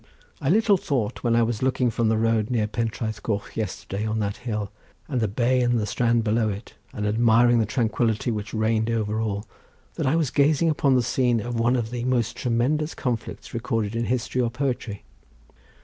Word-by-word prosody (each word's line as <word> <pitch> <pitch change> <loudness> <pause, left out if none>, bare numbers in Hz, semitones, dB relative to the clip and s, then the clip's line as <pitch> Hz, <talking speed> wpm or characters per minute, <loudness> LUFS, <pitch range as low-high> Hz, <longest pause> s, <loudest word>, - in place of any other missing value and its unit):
I 135 - 0
little 210 +2 +4
thought 125 - -2
when 115 -2 +2
I 115 - +4
was 115 -2 -2
looking 130 -2 +1
from 115 0 +1
the 110 - +2
road 110 -1 +1
near 115 -4 +1
Pentraeth 110 0 -3
Coch 105 -3 -3
yesterday 100 -1 -4
on 110 0 -1
that 100 -1 -2
hill, 105 -5 -4 0.4
and 130 -5 -1
the 110 - +2
bay 125 +5 +1
and 120 -3 +1
strand 115 0 +1
below 110 0 +1
it, 100 +2 -7 0.2
and 105 - -4
admiring 115 +2 +4
the 110 - +1
tranquillity 115 0 0
which 105 -2 -4
reigned 110 0 +1
over 110 -1 -1
all, 105 -2 -2 0.5
that - - 0
I 140 - +3
was 155 -6 +1
gazing 150 +3 +3
upon 140 -3 +2
the 125 - +3
scene 125 -1 +1
of 120 +2 -3
one 120 +2 +3
of 115 -2 -2
the 120 -1 -3
most 120 -3 0
tremendous 135 +6 0
conflicts 120 -3 -4
recorded 115 -2 -2
in 115 0 0
history 125 +1 -1
or 120 - +1
poetry." 125 -5 -3
115 Hz, 195 wpm, -24 LUFS, 110-125 Hz, 0.5 s, little